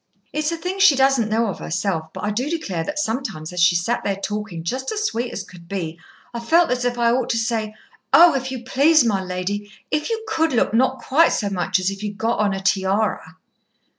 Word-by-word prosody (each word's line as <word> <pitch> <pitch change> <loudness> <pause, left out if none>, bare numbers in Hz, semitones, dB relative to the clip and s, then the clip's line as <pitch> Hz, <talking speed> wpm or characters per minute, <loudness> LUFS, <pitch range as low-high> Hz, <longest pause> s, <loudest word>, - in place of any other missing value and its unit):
It's 305 +1 -1
a 335 - -3
thing 365 +3 -4
she 390 -8 +6
doesn't 265 -4 +3
know 225 +2 +1
of 200 - -4
herself, 165 -3 -2
but 190 - -8
I 210 - 0
do 250 +7 -2
declare 205 - -3
that 300 - -5
sometimes 220 - -3
as 180 - -4
she's 175 0 +4
sat 240 - -1
there 200 - 0
talking 205 -4 -5
just 260 +10 -3
as 430 0 -2
sweet 240 - -2
as 195 - -5
could 180 -3 -15
be, 170 -4 -4 0.3
I've 235 0 -7
felt 335 -1 +4
as 250 0 0
if 245 0 -1
I 235 -1 +3
ought 250 0 0
to 230 - +1
say, 220 -2 -2 0.4
'Oh! 340 -1 +8
if 265 -1 -2
you 255 -2 -6
please, 285 +4 +4
my 200 -4 +1
lady, 190 +3 -4 0.2
if 300 +6 -1
you 450 -1 -2
could 325 -8 +1
look 225 -3 +1
not 260 +3 +1
quite 320 +5 +4
so 205 -2 -1
much 185 0 0
as 185 +1 0
if 195 0 -8
you'd 205 -1 -5
got 230 +1 -1
on 210 -1 +2
a 195 0 -3
tiara.'" 190 -4 0
225 Hz, 230 wpm, -21 LUFS, 195-265 Hz, 0.4 s, Oh